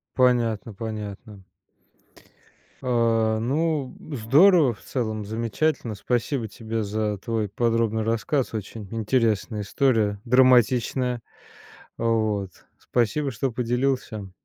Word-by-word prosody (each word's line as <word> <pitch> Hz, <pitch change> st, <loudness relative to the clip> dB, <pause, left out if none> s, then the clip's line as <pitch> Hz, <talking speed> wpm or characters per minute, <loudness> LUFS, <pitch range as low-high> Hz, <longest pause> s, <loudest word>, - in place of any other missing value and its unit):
Понятно, 120 Hz, -4 st, +2 dB
понятно. 105 Hz, -2 st, -7 dB, 1.4 s
А, 115 Hz, -3 st, +2 dB
ну, 145 Hz, +3 st, -1 dB, 0.2 s
здорово, 140 Hz, -, +5 dB
в -, -, -20 dB
целом 110 Hz, -5 st, -3 dB
замечательно. 115 Hz, +3 st, -1 dB
Спасибо 120 Hz, +2 st, -1 dB
тебе 115 Hz, 0 st, -4 dB
за 105 Hz, 0 st, -1 dB
твой 110 Hz, 0 st, -2 dB
подробный 115 Hz, 0 st, 0 dB
рассказ, 115 Hz, +4 st, -1 dB
очень 105 Hz, -1 st, -6 dB
интересная 110 Hz, -1 st, 0 dB
история, 105 Hz, -2 st, +1 dB
драматичная. 125 Hz, 0 st, +3 dB, 0.8 s
Вот, 110 Hz, -4 st, 0 dB, 0.3 s
спасибо 130 Hz, +4 st, 0 dB
что 130 Hz, +2 st, -2 dB
поделился. 120 Hz, -3 st, -1 dB
115 Hz, 90 wpm, -24 LUFS, 110-125 Hz, 1.4 s, здорово